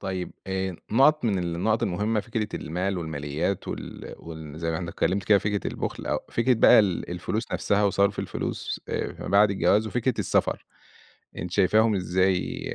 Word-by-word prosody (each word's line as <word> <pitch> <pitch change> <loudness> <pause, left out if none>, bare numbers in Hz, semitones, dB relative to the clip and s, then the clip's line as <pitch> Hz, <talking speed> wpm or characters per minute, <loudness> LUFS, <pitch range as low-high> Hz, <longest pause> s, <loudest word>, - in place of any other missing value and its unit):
طيب 95 -2 -4
آآ، 95 -1 -2 0.2
نقط 150 +4 +5
من 105 -5 +1
النقط 90 +6 0
المهمّة 105 +2 0
فكرة 110 -1 -3
المال 90 +3 -2
والماليات 80 +3 -3
وال - - -7
وال 80 -2 -9
زي 80 0 -2
ما 80 - -1
إحنا 85 0 -4
اتكلمت 95 +3 0
كده 105 +1 +5
فكرة 105 0 -2
البخل - - -5
أو - - 0
فكرة 125 +2 +3
بقى 115 - +7
ال 95 -6 +1
الفلوس 95 +6 -3
نفسها 105 +1 +1
وصرف 100 0 +2
الفلوس - - -3
آآ - - -2
فيما - - -8
بعد 100 +1 +5
الجواز 105 +2 +2
وفكرة 125 +2 0
السفر، - - 0 0.7
أنتِ 90 - -5
شايفاهم 105 +3 +4
إزاي، 95 0 0
95 Hz, 165 wpm, -26 LUFS, 90-110 Hz, 0.7 s, بقى